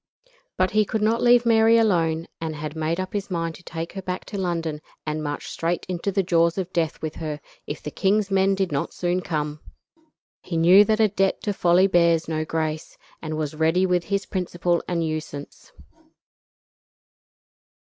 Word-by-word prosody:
But 185 Hz, 0 st, +2 dB
he 215 Hz, +1 st, +4 dB
could 210 Hz, +1 st, -2 dB
not 225 Hz, +2 st, +2 dB
leave 240 Hz, 0 st, +5 dB
Mary 225 Hz, 0 st, +5 dB
alone, 165 Hz, -7 st, +2 dB
and 160 Hz, -1 st, -3 dB
had 150 Hz, 0 st, -6 dB
made 160 Hz, +2 st, -1 dB
up 185 Hz, 0 st, -4 dB
his 205 Hz, -1 st, -3 dB
mind 165 Hz, -2 st, -2 dB
to 180 Hz, -, -14 dB
take 165 Hz, 0 st, -6 dB
her 195 Hz, -, -5 dB
back 180 Hz, 0 st, -4 dB
to -, -, -2 dB
London 165 Hz, -4 st, -2 dB, 0.2 s
and 155 Hz, 0 st, -2 dB
march 145 Hz, -1 st, -4 dB
straight 170 Hz, +1 st, -2 dB
into 185 Hz, +2 st, -2 dB
the 195 Hz, 0 st, +1 dB
jaws 170 Hz, -1 st, +2 dB
of 185 Hz, -1 st, -3 dB
death 165 Hz, -3 st, -1 dB
with 155 Hz, -1 st, -4 dB
her, 155 Hz, -2 st, -4 dB, 0.3 s
if 145 Hz, -, -6 dB
the 150 Hz, -, -5 dB
king's 200 Hz, +3 st, +1 dB
men 195 Hz, 0 st, +3 dB
did 190 Hz, -3 st, -1 dB
not 140 Hz, -, -2 dB
soon 180 Hz, +1 st, 0 dB
come. 150 Hz, -3 st, -3 dB, 0.8 s
He 170 Hz, -, -4 dB
knew 180 Hz, +5 st, +7 dB
that 215 Hz, +1 st, +1 dB
a 220 Hz, -, +5 dB
debt 195 Hz, -1 st, 0 dB
to 205 Hz, -, -1 dB
folly 180 Hz, 0 st, +4 dB
bears 170 Hz, -3 st, +3 dB
no 155 Hz, -1 st, -1 dB
grace, 155 Hz, -1 st, -3 dB, 0.2 s
and 155 Hz, -1 st, -4 dB
was 155 Hz, -2 st, -2 dB
ready 160 Hz, +4 st, +2 dB
with 180 Hz, -2 st, +1 dB
his 200 Hz, -1 st, -1 dB
principal 175 Hz, -2 st, -1 dB
and 170 Hz, -2 st, -1 dB
usance. 155 Hz, -2 st, -6 dB
175 Hz, 185 wpm, -24 LUFS, 160-195 Hz, 0.8 s, knew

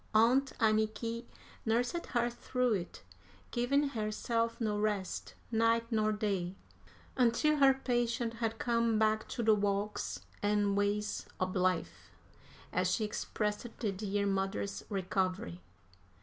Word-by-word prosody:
Aunt 250 Hz, +5 st, +5 dB
Anniky 220 Hz, +2 st, +1 dB, 0.4 s
nursed 245 Hz, +9 st, 0 dB
her 240 Hz, -2 st, +1 dB
through 245 Hz, 0 st, 0 dB
it, 180 Hz, -3 st, -4 dB, 0.5 s
giving 275 Hz, +4 st, +2 dB
herself 230 Hz, 0 st, -1 dB
no 210 Hz, -3 st, 0 dB
rest, 210 Hz, -3 st, -2 dB, 0.2 s
night 230 Hz, 0 st, +3 dB
nor 215 Hz, -1 st, +2 dB
day, 195 Hz, -4 st, -1 dB, 0.6 s
until 260 Hz, +5 st, +3 dB
her 270 Hz, -2 st, +6 dB
patient 240 Hz, -3 st, 0 dB
had 225 Hz, -1 st, 0 dB
come 230 Hz, -2 st, +2 dB
"back 215 Hz, 0 st, +2 dB
to 235 Hz, -, -3 dB
de 220 Hz, 0 st, +6 dB
walks 205 Hz, 0 st, -1 dB, 0.2 s
an' 205 Hz, -1 st, +2 dB
ways 205 Hz, +1 st, 0 dB
ob 185 Hz, +1 st, -1 dB
life," 180 Hz, -, 0 dB, 0.6 s
as 185 Hz, 0 st, +2 dB
she 215 Hz, +3 st, +1 dB
expressed 210 Hz, +1 st, -2 dB
the 215 Hz, -4 st, -1 dB
dear 200 Hz, +1 st, -1 dB
mother's 195 Hz, 0 st, -1 dB
recovery. 185 Hz, -, -1 dB
215 Hz, 120 wpm, -33 LUFS, 200-235 Hz, 0.6 s, her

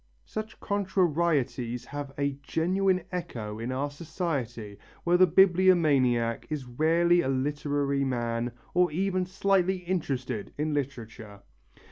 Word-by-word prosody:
Such 215 Hz, 0 st, -6 dB
contrarieties 170 Hz, -, 0 dB
have 145 Hz, -1 st, -6 dB
a 140 Hz, -1 st, -1 dB
genuine 185 Hz, +5 st, +1 dB
echo 115 Hz, -, -5 dB
in 115 Hz, +3 st, -3 dB
our 140 Hz, +3 st, -2 dB
society 140 Hz, -, -4 dB, 0.2 s
where 175 Hz, +1 st, +3 dB
the 185 Hz, +1 st, +6 dB
bibliomaniac 155 Hz, -11 st, +3 dB
is 150 Hz, -4 st, -3 dB
rarely 165 Hz, +7 st, +3 dB
a 135 Hz, -, -2 dB
literary 140 Hz, +1 st, 0 dB
man 120 Hz, -2 st, -1 dB, 0.2 s
or 180 Hz, -1 st, +3 dB
even 185 Hz, +2 st, 0 dB
slightly 190 Hz, 0 st, +1 dB
interested 135 Hz, -, -3 dB
in 150 Hz, +1 st, -1 dB
literature. 115 Hz, -7 st, -5 dB
145 Hz, 115 wpm, -28 LUFS, 125-180 Hz, 0.2 s, the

